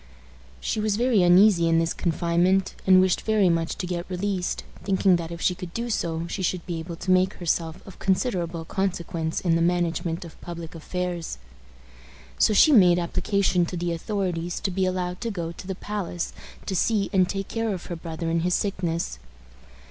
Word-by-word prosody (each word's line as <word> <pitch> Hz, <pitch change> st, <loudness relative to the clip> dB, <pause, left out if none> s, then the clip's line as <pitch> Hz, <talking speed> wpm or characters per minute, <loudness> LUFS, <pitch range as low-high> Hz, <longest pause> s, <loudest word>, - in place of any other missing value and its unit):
She 220 Hz, -, -2 dB
was 210 Hz, -1 st, +1 dB
very 235 Hz, -2 st, +3 dB
uneasy 175 Hz, -1 st, +6 dB
in 165 Hz, -, +4 dB
this 165 Hz, 0 st, +1 dB
confinement, 175 Hz, +3 st, +1 dB
and 185 Hz, -1 st, +8 dB
wished 185 Hz, -1 st, +3 dB
very 215 Hz, -4 st, +3 dB
much 165 Hz, -1 st, 0 dB
to -, -, -4 dB
get 175 Hz, 0 st, -4 dB
released, 185 Hz, 0 st, -2 dB, 0.2 s
thinking 190 Hz, -2 st, +3 dB
that 165 Hz, -1 st, -5 dB
if 170 Hz, -, -7 dB
she 180 Hz, -, +2 dB
could 175 Hz, -1 st, -9 dB
do 235 Hz, +1 st, -2 dB
so 165 Hz, -4 st, -1 dB
she 180 Hz, +3 st, -4 dB
should 180 Hz, -1 st, -1 dB
be 170 Hz, -3 st, -3 dB
able 165 Hz, +1 st, -6 dB
to 180 Hz, +3 st, -2 dB
make 185 Hz, +1 st, +3 dB
herself 165 Hz, -1 st, -2 dB
of 195 Hz, -, -12 dB
considerable 175 Hz, -5 st, -1 dB
consequence 170 Hz, -3 st, -2 dB
in 175 Hz, -3 st, +2 dB
the 165 Hz, -, +2 dB
management 170 Hz, -1 st, 0 dB
of 165 Hz, -, -13 dB
public 170 Hz, -2 st, -7 dB
affairs. 175 Hz, -, -4 dB, 1.0 s
So -, -, +5 dB
she 260 Hz, +9 st, +6 dB
made 180 Hz, -9 st, +6 dB
application 180 Hz, +1 st, +1 dB
to 180 Hz, -, -5 dB
the 175 Hz, 0 st, -1 dB
authorities 175 Hz, -1 st, -2 dB
to 195 Hz, -, -1 dB
be 185 Hz, +1 st, +1 dB
allowed 180 Hz, -1 st, -2 dB
to 235 Hz, -, -2 dB
go 170 Hz, -6 st, -4 dB
to 170 Hz, -, -10 dB
the 190 Hz, -, -3 dB
palace 190 Hz, -3 st, -4 dB, 0.3 s
to 190 Hz, -, -2 dB
see 205 Hz, +2 st, +1 dB
and 185 Hz, -2 st, +3 dB
take 195 Hz, -1 st, -3 dB
care 225 Hz, -1 st, -1 dB
of 185 Hz, -3 st, -5 dB
her 175 Hz, -, -5 dB
brother 165 Hz, 0 st, -5 dB
in 165 Hz, -, +2 dB
his 180 Hz, +2 st, +1 dB
sickness. 170 Hz, -, -2 dB
180 Hz, 190 wpm, -25 LUFS, 170-195 Hz, 1.0 s, and